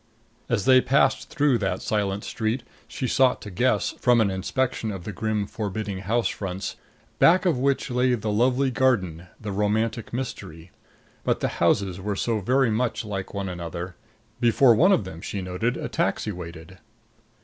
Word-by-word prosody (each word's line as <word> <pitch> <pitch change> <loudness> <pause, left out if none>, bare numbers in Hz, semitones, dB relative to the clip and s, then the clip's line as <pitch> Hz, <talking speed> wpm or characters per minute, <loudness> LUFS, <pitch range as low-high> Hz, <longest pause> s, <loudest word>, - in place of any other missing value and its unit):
As - - 0
they 130 -1 +7
passed 135 0 +2
through 145 -6 +2
that - - -2
silent 100 -2 -1
Street 115 +2 -2 0.2
she 130 - -4
sought 130 0 +3
to 105 - -8
guess, 125 +8 +1
from 125 -2 +4
an 105 -3 +3
inspection 115 +5 -1
of 95 -4 -5
the 105 - -5
grim 105 +1 -1
forbidding 100 -2 -4
house 110 +3 0
fronts, 95 -1 -4 0.4
back 180 +3 +5
of 165 -8 +2
which 135 0 0
lay 125 0 +2
the 105 -2 -3
lovely 130 +5 +2
garden, 95 -10 +1
the 105 -2 -5
romantic 110 +3 -1
mystery. 95 -10 -6 0.5
But - - +1
the - - 0
houses 95 -2 +2
were 100 +1 -2
so 110 +2 0
very 125 +4 +2
much 115 0 -1
like 100 -2 -5
one 100 -1 -2
another. 85 0 -6 0.4
Before 120 +1 +5
one 180 - +5
of 155 - +3
them, 85 -3 -9
she 100 - -4
noted, 95 +7 -2
a - - -4
taxi 105 - -1
waited. 85 0 -9
110 Hz, 170 wpm, -25 LUFS, 95-125 Hz, 0.5 s, they